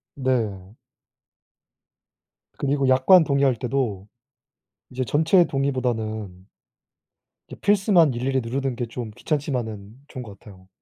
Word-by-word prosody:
네. 110 Hz, -7 st, -2 dB, 1.8 s
그리고 140 Hz, -1 st, 0 dB
약관 135 Hz, +7 st, +6 dB
동의할 140 Hz, -3 st, +2 dB
때도 115 Hz, -5 st, -3 dB, 0.8 s
이제 130 Hz, +1 st, -3 dB
전체 160 Hz, +7 st, +3 dB
동의보다는 110 Hz, -, -3 dB, 1.0 s
이제 -, -, -10 dB
필수만 195 Hz, -7 st, +3 dB
일일이 130 Hz, +2 st, -1 dB
누르는 130 Hz, +2 st, -3 dB
게 120 Hz, -1 st, -3 dB
좀 115 Hz, -1 st, -6 dB
귀찮지만은 115 Hz, -9 st, -3 dB
좋은 130 Hz, -3 st, -7 dB
것 105 Hz, -4 st, -12 dB
같아요. 95 Hz, -4 st, -16 dB
130 Hz, 245 characters per minute, -23 LUFS, 110-140 Hz, 1.8 s, 약관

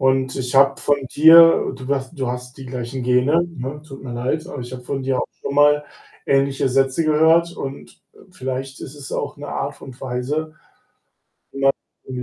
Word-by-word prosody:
Und 130 Hz, 0 st, +1 dB
ich 125 Hz, -1 st, -4 dB
habe 135 Hz, 0 st, +5 dB
von 145 Hz, -2 st, 0 dB
dir 165 Hz, +3 st, +7 dB
du 130 Hz, 0 st, -9 dB
hast 140 Hz, +2 st, -3 dB
du 130 Hz, -, -1 dB
hast 125 Hz, +1 st, -6 dB
die 135 Hz, -, -9 dB
gleichen 125 Hz, 0 st, -5 dB
Gene, 125 Hz, +7 st, +3 dB
ne, 135 Hz, +4 st, -5 dB
tut 135 Hz, -3 st, -11 dB
mir 125 Hz, -, -6 dB
leid, 130 Hz, +7 st, -2 dB
aber 145 Hz, -, -7 dB
ich 120 Hz, 0 st, -8 dB
habe 125 Hz, -1 st, -7 dB
von 135 Hz, +2 st, -4 dB
dir 130 Hz, -1 st, 0 dB
auch -, -, -1 dB
schon 140 Hz, -, -4 dB
mal 145 Hz, 0 st, +4 dB, 0.4 s
ähnliche 135 Hz, -1 st, +2 dB
Sätze 135 Hz, +4 st, +1 dB
gehört, 160 Hz, +2 st, +3 dB
und, 135 Hz, +1 st, -8 dB
äh, -, -, -23 dB
vielleicht 135 Hz, -3 st, -5 dB
ist 135 Hz, -, -8 dB
es 145 Hz, -2 st, -10 dB
auch 145 Hz, -, -3 dB
'ne 145 Hz, -, -8 dB
Art 145 Hz, +1 st, -4 dB
und 130 Hz, -2 st, -11 dB
Weise 135 Hz, +5 st, -3 dB, 1.5 s
wenn 130 Hz, -, -8 dB
man 125 Hz, -, -4 dB
135 Hz, 190 wpm, -21 LUFS, 130-145 Hz, 1.5 s, dir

